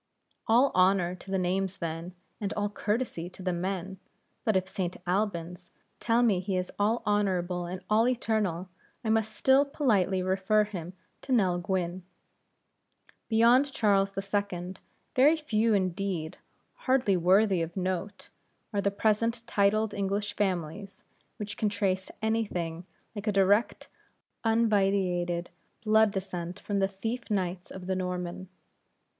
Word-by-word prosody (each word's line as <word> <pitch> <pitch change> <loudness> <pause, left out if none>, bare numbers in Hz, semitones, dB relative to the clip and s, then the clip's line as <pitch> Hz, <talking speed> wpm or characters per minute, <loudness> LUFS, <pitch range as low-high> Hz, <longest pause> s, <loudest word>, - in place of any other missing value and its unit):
All 245 +5 +5
honor 185 -1 +3
to 185 +1 -12
the 190 - 0
names 190 +1 -1
then, 165 +2 -5 0.2
and 205 -2 -2
all 205 0 -1
courtesy 210 -5 -2
to 185 - -12
the 185 -1 0
men; 190 +1 -3 0.4
but 220 - +1
if 185 0 +1
St. 185 -2 -3
Albans 180 -2 -2 0.3
tell 235 +1 +2
me 210 -6 +3
he 190 0 -2
is 180 0 -3
all 215 +4 +1
honorable 185 -4 0
and 185 +2 -6
all 220 +3 +3
eternal, 215 -8 0 0.4
I 220 - 0
must 220 -1 0
still 265 +1 +5
politely 205 - +1
refer 190 +3 +2
him 180 -4 -6 0.3
to 270 - -7
Nell 190 -8 +3
Gwynne. 185 -1 -2 1.3
Beyond 240 +5 +5
Charles 200 -5 +2
II. 195 -2 -2 0.4
very 290 +5 +5
few 225 -7 +1
indeed 185 -3 -2 0.5
hardly 255 -7 +3
worthy 185 +2 +4
of 165 +3 -4
note 185 +2 -3 0.4
are 200 - +1
the 200 - +2
present 230 +3 0
titled 215 0 +2
English 200 +1 -2
families 190 0 -3 0.3
which 205 -1 -6
can 215 - +1
trace 195 -2 -1
any 225 +1 +2
thing 170 -3 -5 0.3
like 205 +1 -6
a - - +3
direct 200 +3 +2 0.6
unvitiated 195 -6 +1 0.3
blood 220 0 +5
descent 185 -2 -5
from 205 -1 -2
the 195 - +3
thief 225 +5 -5
knights 185 -3 -2
of 190 -1 -8
the 190 0 -1
Norman. 180 0 -4
195 Hz, 140 wpm, -29 LUFS, 180-215 Hz, 1.3 s, All